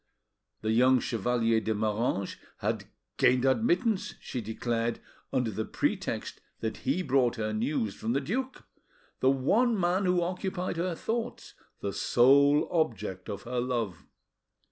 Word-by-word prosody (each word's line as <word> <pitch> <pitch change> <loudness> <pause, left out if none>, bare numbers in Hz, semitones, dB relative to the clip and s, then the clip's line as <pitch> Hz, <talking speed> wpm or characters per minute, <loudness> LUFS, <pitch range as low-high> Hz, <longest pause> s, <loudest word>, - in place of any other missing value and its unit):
The 110 - 0
young 125 +3 +5
Chevalier 115 0 +1
de 110 0 -1
Moranges 105 -2 -1 0.2
had, - - -2 0.3
gained 125 +1 +4
admittance, 205 - +1
she 125 - -5
declared, 115 +1 -2 0.3
under 125 -4 0
the 110 +2 -2
pretext - - -2 0.2
that 110 -1 -3
he 185 - -1
brought 130 -5 +2
her 110 -2 -2
news 110 -1 -1
from 110 +3 -2
the 135 - +2
duke, 255 - -3 0.6
the 130 - +4
one 205 - +2
man 180 +2 +1
who 180 -1 +3
occupied 180 0 -3
her 175 0 -1
thoughts, 230 +6 -4 0.3
the 100 - -2
sole 140 +4 +4
object 105 - -1
of 100 - -5
her 125 +1 -2
love. 120 -7 -2
125 Hz, 140 wpm, -29 LUFS, 110-175 Hz, 0.6 s, young